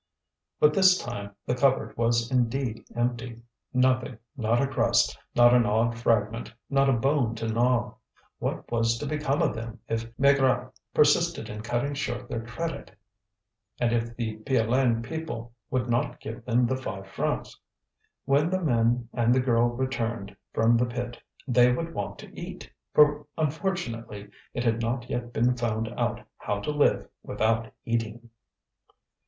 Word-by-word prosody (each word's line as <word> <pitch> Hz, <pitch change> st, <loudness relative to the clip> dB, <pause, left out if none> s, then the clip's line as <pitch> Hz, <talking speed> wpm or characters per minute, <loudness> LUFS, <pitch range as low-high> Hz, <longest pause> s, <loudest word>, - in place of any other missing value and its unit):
But 150 Hz, 0 st, +5 dB
this 185 Hz, 0 st, +6 dB
time 100 Hz, -, -6 dB
the -, -, 0 dB
cupboard 130 Hz, +1 st, +1 dB
was 115 Hz, +1 st, +1 dB
indeed 125 Hz, -1 st, 0 dB
empty: 120 Hz, -1 st, -2 dB, 0.3 s
nothing, 130 Hz, -1 st, +2 dB, 0.2 s
not 115 Hz, -2 st, +1 dB
a 140 Hz, -, +3 dB
crust, 120 Hz, -3 st, +2 dB, 0.2 s
not 120 Hz, 0 st, +7 dB
an 125 Hz, -1 st, +6 dB
odd 115 Hz, +3 st, +2 dB
fragment, 115 Hz, -1 st, 0 dB, 0.2 s
not 135 Hz, 0 st, +4 dB
a -, -, +4 dB
bone 125 Hz, -1 st, +1 dB
to 115 Hz, 0 st, -3 dB
gnaw. 120 Hz, 0 st, +1 dB, 0.5 s
What -, -, -4 dB
was 115 Hz, 0 st, +2 dB
to 145 Hz, -, -5 dB
become 145 Hz, -1 st, 0 dB
of -, -, +1 dB
them 115 Hz, +1 st, -7 dB
if 115 Hz, 0 st, -3 dB
Maigrat 140 Hz, -1 st, +3 dB, 0.2 s
persisted -, -, +3 dB
in 105 Hz, 0 st, -6 dB
cutting 120 Hz, +5 st, -1 dB
short 125 Hz, -4 st, -3 dB
their 115 Hz, -, -3 dB
credit, 140 Hz, 0 st, -5 dB, 0.8 s
and 120 Hz, -1 st, +2 dB
if 115 Hz, 0 st, -1 dB
the 110 Hz, -2 st, -3 dB
Piolaine 120 Hz, 0 st, +1 dB
people 120 Hz, -6 st, -5 dB, 0.2 s
would 125 Hz, -1 st, 0 dB
not 120 Hz, 0 st, 0 dB
give 115 Hz, +1 st, -8 dB
them 125 Hz, 0 st, +3 dB
the 130 Hz, +2 st, 0 dB
five 95 Hz, -7 st, -6 dB
francs? 95 Hz, -, -3 dB, 0.7 s
When 145 Hz, +4 st, +3 dB
the 185 Hz, +1 st, 0 dB
men 120 Hz, -6 st, +1 dB
and 120 Hz, 0 st, +3 dB
the -, -, +4 dB
girl 120 Hz, -2 st, +3 dB
returned 120 Hz, -4 st, -3 dB, 0.2 s
from 115 Hz, +1 st, +3 dB
the 125 Hz, +1 st, +2 dB
pit 120 Hz, 0 st, -5 dB, 0.3 s
they 125 Hz, -1 st, +5 dB
would 165 Hz, +6 st, -2 dB
want 100 Hz, -, -4 dB
to -, -, -13 dB
eat, -, -, -8 dB, 0.2 s
for 150 Hz, -1 st, +4 dB
unfortunately 140 Hz, -, -3 dB, 0.2 s
it 120 Hz, -, -1 dB
had 115 Hz, -1 st, +1 dB
not 120 Hz, +1 st, -2 dB
yet 120 Hz, 0 st, -3 dB
been 120 Hz, +2 st, +2 dB
found 115 Hz, -2 st, -1 dB
out -, -, -2 dB, 0.2 s
how 105 Hz, -, -2 dB
to 150 Hz, -, -2 dB
live 145 Hz, -1 st, +2 dB
without 115 Hz, +1 st, 0 dB
eating. 115 Hz, 0 st, -3 dB
120 Hz, 155 wpm, -27 LUFS, 115-130 Hz, 0.8 s, not